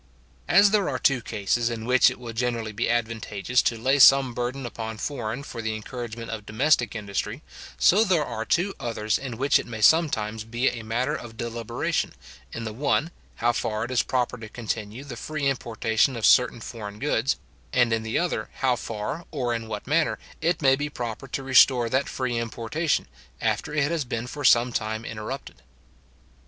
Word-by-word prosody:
As 200 0 +6
there 210 -5 +2
are 130 - -1
two 130 0 +2
cases 115 +2 0
in 115 -1 -5
which 125 +1 +5
it - - -8
will 120 -2 -7
generally 115 -2 -1
be 105 +3 -1
advantageous 115 0 0
to 115 - 0
lay 135 +5 +2
some 135 -1 +7
burden 125 +2 -3
upon 110 -2 -5
foreign 120 0 -4
for 115 - -7
the 110 -1 -2
encouragement 115 +1 -6
of 110 -2 -5
domestic 120 -1 +2
industry, 105 +4 -4 0.3
so 205 +5 +5
there 180 -8 +2
are 115 -3 -4
two 180 - +1
others 110 -4 -1
in 125 -4 -6
which 140 +3 +3
it - - -6
may 115 -2 -6
sometimes 110 -6 +3
be 120 +3 0
a 120 - -6
matter 115 +3 -1
of 115 -2 -9
deliberation, 115 -1 -2 0.4
in 115 - -5
the 110 -1 -4
one, 145 +6 0 0.2
how 120 +1 +2
far 110 -2 -2
it 125 - -7
is 125 - +3
proper 125 -1 -1
to 110 -2 -9
continue 110 +1 -5
the 135 -4 -8
free 150 +4 -3
importation 115 -1 +1
of 115 - -1
certain 125 -2 +5
foreign 105 -3 -7
goods; 135 0 +1 0.4
and, 120 -2 +3
in 110 - +1
the 110 0 -2
other, 175 0 -1
how 130 -2 +1
far, 115 +9 -5
or 125 -5 -1
in 115 -1 -4
what 105 -2 -5
manner, 155 +4 +1 0.2
it 165 0 0
may 135 -1 +6
be 145 +2 -3
proper 120 -1 -5
to 135 +1 -4
restore 130 -2 +5
that 130 +2 +1
free 125 -3 -2
importation, 115 +7 -1 0.3
after - - -1
it 150 0 +1
has 165 -3 0
been 120 -2 -4
for 145 +4 -7
some 120 +1 +5
time 110 +1 -2
interrupted. 110 -1 -6
120 Hz, 190 wpm, -25 LUFS, 110-135 Hz, 0.4 s, some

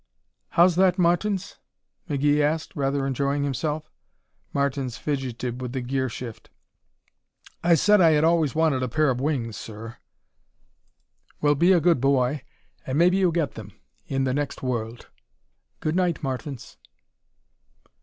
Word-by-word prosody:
"How's 175 0 +5
that, 185 0 +4
Martins?" 185 +3 0 0.5
McGee 145 +1 +2
asked, 155 +2 -1
rather 140 -1 0
enjoying 140 +2 0
himself. 150 +2 -3 0.6
Martins 135 -3 -1
fidgeted 130 -3 -3
with 125 -1 -5
the 130 - -2
gear 130 +1 -1
shift. 115 -1 -8 1.1
"I 170 0 +5
said 210 +5 +4
I 165 -2 +6
had 150 0 +3
always 160 -4 +2
wanted 155 -5 +2
a 130 - 0
pair 155 +2 +2
of 125 0 -3
wings, 130 -7 -2
sir." 115 +1 -9 1.4
"Well, 145 0 +3
be 170 +6 +3
a 180 - +5
good 165 -5 +2
boy 135 0 +2 0.4
and 130 +2 -3
maybe 180 +3 +4
you'll 185 -3 +3
get 160 -6 0
them - - -10 0.3
in 135 0 -1
the 130 -1 0
next 145 -1 -3
world. 120 -2 -3 0.8
Good 155 +1 -1
night, 180 -4 0
Martins." 135 -1 -5
145 Hz, 140 wpm, -25 LUFS, 130-165 Hz, 1.4 s, I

